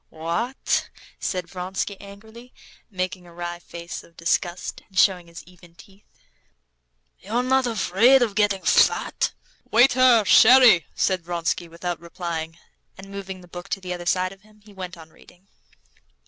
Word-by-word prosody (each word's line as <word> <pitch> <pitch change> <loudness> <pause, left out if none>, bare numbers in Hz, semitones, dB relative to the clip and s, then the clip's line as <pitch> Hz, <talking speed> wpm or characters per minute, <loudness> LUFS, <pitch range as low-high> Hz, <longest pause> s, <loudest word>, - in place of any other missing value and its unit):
"What?" 170 +11 -2 0.3
said 180 -2 -3
Vronsky 185 +3 -4
angrily, 220 +5 -14 0.3
making 185 -2 -4
a 170 - -15
wry 175 0 -5
face 170 0 -9
of 170 - -22
disgust, 175 +1 -2
and 190 - -14
showing 180 -3 +3
his 170 0 -11
even 175 -1 -19
teeth. 195 +2 -19 1.1
"You're 230 +5 -2
not 260 0 +2
afraid 235 +4 +4
of 220 -4 -2
getting 205 -2 +1
fat?" - - +2 0.4
"Waiter, 245 -1 +5
sherry!" 240 -5 +7
said 185 -3 0
Vronsky, 170 0 -2
without 170 +1 -5
replying, 170 -1 -6 0.4
and 195 +1 -12
moving 190 -1 -7
the 180 - -16
book 175 +2 -10
to - - -2
the 180 -1 -5
other 175 -1 -7
side 185 +1 +1
of 195 0 -15
him, 215 0 -24
he 210 - -16
went 185 -2 -8
on 160 -1 -14
reading. 180 +2 -21
185 Hz, 150 wpm, -23 LUFS, 175-215 Hz, 1.1 s, sherry